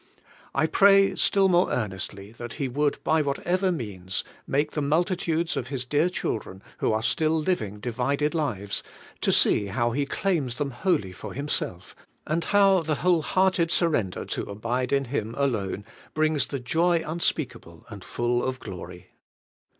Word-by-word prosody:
I - - +3
pray 195 +3 +5
still 195 0 +3
more 180 -1 +3
earnestly 100 -2 -4
that 120 -1 -6
He 140 - -2
would, 145 +3 0
by 160 0 +3
whatever 175 +6 0
means, 95 - -4 0.2
make 145 +2 +1
the 150 - -2
multitudes 165 +2 0
of 125 - -3
His 130 -1 -4
dear 150 +6 +2
children 105 - -4 0.2
who - - +1
are 110 0 0
still 160 +4 +2
living 110 - -1
divided 135 +7 -1
lives, 105 - -2 0.4
to - - +2
see 100 - +3
how 120 +5 0
He 140 +3 -1
claims 150 -9 0
them 145 -2 -2
wholly 120 - 0
for 90 - -8
Himself, 130 -10 -3 0.3
and 165 +2 -1
how 195 -2 +5
the 155 -2 -1
whole 175 -3 +4
hearted 185 0 +2
surrender 150 - +1
to - - -4
abide 120 +5 -2
in 140 -1 +2
Him 115 -3 -3
alone 105 -7 -1 0.3
brings 155 -1 +2
the 140 - -4
joy 165 +6 +2
unspeakable 150 - -3
and 100 -4 -9
full 120 0 0
of 130 0 -2
glory. 90 -4 -9
140 Hz, 160 wpm, -26 LUFS, 115-165 Hz, 0.4 s, pray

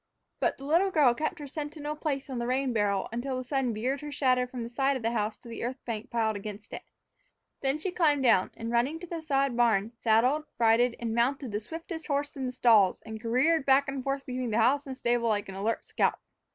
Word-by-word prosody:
But - - +1
the 275 - -10
little 340 +7 +3
girl 295 -9 +4
kept 310 +7 -2
her 295 - -7
sentinel 295 +1 -5
place 285 -3 -3
on 260 -3 -4
the 235 - -2
rain 260 0 0
barrel 205 -3 +1
until 255 +3 -3
the 255 - -3
sun 260 -1 0
veered 250 +6 -2
her 295 0 -6
shadow 255 -3 +2
from 250 -1 -6
the - - -5
side 270 +2 +1
of 245 - -9
the 230 - +1
house 215 -2 -1
to - - -16
the 230 - -6
earth 250 +3 -3
bank 225 -2 -4
piled 220 -2 0
against 205 +1 -8
it. - - -5 0.8
Then 270 +1 +1
she 360 +4 -3
climbed 300 -6 +2
down 225 -7 +4
and, 230 0 -4
running 255 +7 +1
to - - -6
the 335 -1 -5
sod 275 -4 +1
barn, 230 -3 +2
saddled, 240 +7 +2
bridled, 235 +1 +3
and 230 -1 -2
mounted 250 +2 0
the 205 - -1
swiftest 325 - -7
horse 285 -1 -1
in 265 -2 -3
the - - -3
stalls 225 -7 +4
and 220 0 -7
careered 265 +7 +2
back 275 +1 +4
and 275 -1 -4
forth 275 +1 -2
between 250 -3 -3
house 255 +6 +3
and 260 -1 -6
stable 240 -2 +1
like 205 -2 0
an - - -6
alert 215 +4 -2
scout. - - +1
255 Hz, 230 wpm, -29 LUFS, 230-280 Hz, 0.8 s, girl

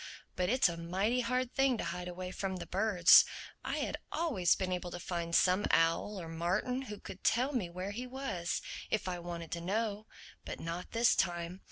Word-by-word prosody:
But 180 0 0
it's 255 0 +4
a 170 -1 -4
mighty 190 +9 0
hard 250 +1 -1
thing 270 -2 +3
to - - -3
hide 175 +2 -4
away 180 +1 -5
from 190 0 -3
the 180 - -6
birds. 185 -3 +6 0.4
I - - -2
had - - -2
always 255 - +2
been 185 -1 -2
able 180 0 -2
to 175 - -6
find 170 -1 -2
some 185 +3 +4
owl 165 +5 +2
or 170 - -6
martin 175 +10 -1
who 210 - -6
could 190 - -10
tell 255 +5 +2
me 210 -9 -1
where 185 +3 -5
he 245 +5 -5
was—if 215 -5 -3
I 180 -1 -2
wanted 170 -1 -6
to 170 - -3
know. 210 +3 -2 0.4
But - - -6
not 170 +2 -5
this 230 +1 +4
time. 175 0 -1
185 Hz, 195 wpm, -33 LUFS, 175-225 Hz, 0.4 s, birds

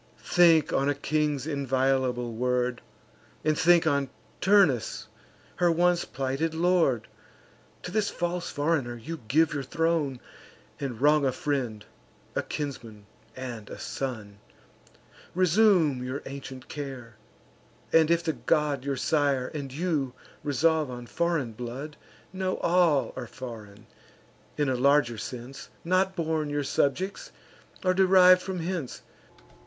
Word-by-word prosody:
Think 165 -4 +4
on 140 +1 +2
a 145 - +1
king's 150 -1 -1
inviolable 130 -4 0
word; 125 +1 0 0.6
And 155 -1 +3
think 175 +1 +4
on 140 -3 +1 0.3
Turnus, 190 - +3 0.5
her 175 -1 +3
once 175 +1 +2
plighted 135 +5 -2
lord: 165 - +2 0.8
To 180 - -6
this 210 0 +1
false 175 0 -3
foreigner 145 -5 -1
you 155 +8 -7
give 155 +6 +3
your 145 - -2
throne, 155 -1 0 0.6
And 130 -5 -4
wrong 150 +1 +4
a 135 - +2
friend, 125 -6 -3 0.5
a - - +1
kinsman, 115 -8 -6 0.3
and 120 -5 -7
a - - -8
son. 110 -7 -5 1.0
Resume 180 -7 +3
your 130 +3 -4
ancient 135 -2 -8
care; 130 -6 -7 0.8
and, 160 -1 +5
if 170 0 +2
the 160 - 0
god 140 +2 0
Your 140 -1 -2
sire, 140 -3 +1
and 140 -4 -6
you, 145 -4 -1 0.3
resolve 155 +1 +2
on 120 -1 -7
foreign 165 -4 -1
blood, 125 +6 -7 0.4
Know 185 0 -2
all 170 -5 +2
are 125 -2 -6
foreign, 110 -4 -10 0.7
in 145 -1 +1
a 130 - +1
larger 130 -3 +3
sense, 125 +2 -8 0.2
Not 185 +2 +2
born 160 -3 -1
your 145 0 -1
subjects, 190 - -1 0.5
or 185 - +4
deriv'd 185 -1 +6
from 185 -2 -4
hence. 170 -6 -4
145 Hz, 125 wpm, -27 LUFS, 130-165 Hz, 1.0 s, deriv'd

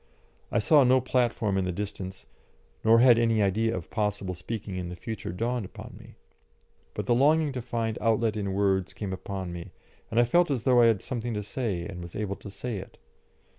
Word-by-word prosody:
I - - +1
saw 140 +7 +5
no 130 +1 +5
platform 120 -6 +1
in 95 - 0
the 90 - -1
distance, 95 0 -6 0.6
nor 115 +1 +6
had 120 -2 +7
any 115 -2 +3
idea 110 +2 +1
of 85 - -8
possible 105 -3 -1
speaking 100 +2 -6
in 90 -1 -4
the 90 - -6
future 110 +1 -5
dawned 115 +5 -1
upon 95 - -10
me. - - -15 0.8
But - - -3
the 120 - +3
longing 150 +4 +3
to 130 -2 -4
find 115 -1 -2
outlet 115 -1 +2
in 100 -2 -2
words 95 -2 +1
came 100 -3 -4
upon 95 -1 -5
me, 85 -1 -8 0.4
and 115 - +1
I - - +7
felt 175 +9 +3
as 130 -5 -1
though 125 -2 +5
I 115 - +7
had 110 -5 +2
something 120 -2 -3
to 105 - -3
say 100 -6 -3
and 90 -2 -7
was 85 0 -9
able 100 -2 -3
to 100 - -10
say 115 +2 -5
it. 95 - -10
110 Hz, 210 wpm, -27 LUFS, 95-120 Hz, 0.8 s, had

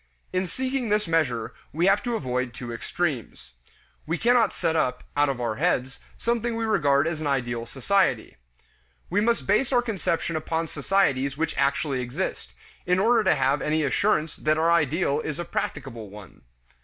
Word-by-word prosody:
In 185 0 0
seeking 260 +3 -2
this 210 -2 +1
measure, 125 -9 0 0.2
we 165 +4 +1
have 200 +2 +4
to 240 -1 -2
avoid 125 - -2
two 120 -3 -6
extremes. 120 - -3 0.6
We 165 +2 0
cannot 235 +1 +3
set 165 -2 -1
up, 125 -5 0
out 145 0 +3
of 135 -3 -2
our 115 -3 -2
heads, 130 +1 0 0.2
something 235 0 -1
we 225 0 -1
regard 145 -9 +3
as 160 -1 -2
an 150 - -2
ideal 120 -4 -1
society. 135 - +1 0.8
We 205 +4 +2
must 235 +2 +1
base 215 +7 +2
our 245 -2 +3
conception 180 -7 -1
upon 160 +1 -1
societies 140 -5 +1
which 165 +1 -1
actually 140 -1 0
exist, 120 0 -4 0.3
in 180 0 +3
order 225 +3 +4
to - - +4
have 135 +2 +1
any 155 +1 +1
assurance 160 +1 +1
that 155 0 +1
our 165 +1 +3
ideal 150 -2 +2
is 150 - -4
a 175 - -4
practicable 120 -10 -4
one. 100 -2 -13
155 Hz, 170 wpm, -25 LUFS, 130-195 Hz, 0.8 s, have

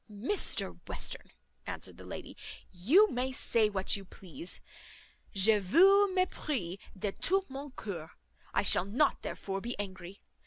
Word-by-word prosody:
"Mr 235 - 0
Western," - - -4 0.4
answered - - -7
the - - -11
lady, - - -8 0.4
"you 265 - +5
may 255 +2 -1
say 230 -4 +1
what 195 -2 0
you 200 - -6
please, 180 -2 -5 0.8
je 210 +2 +6
vous 380 - +5
mesprise 290 - -2 0.2
de 195 +1 -2
tout 385 - 0
mon 275 +2 -6
coeur. 185 - -7 0.4
I - - +1
shall 190 - +6
not 245 +9 +1
therefore 195 0 -5
be 240 +3 -5
angry. 190 -2 -7
210 Hz, 140 wpm, -31 LUFS, 190-290 Hz, 0.8 s, je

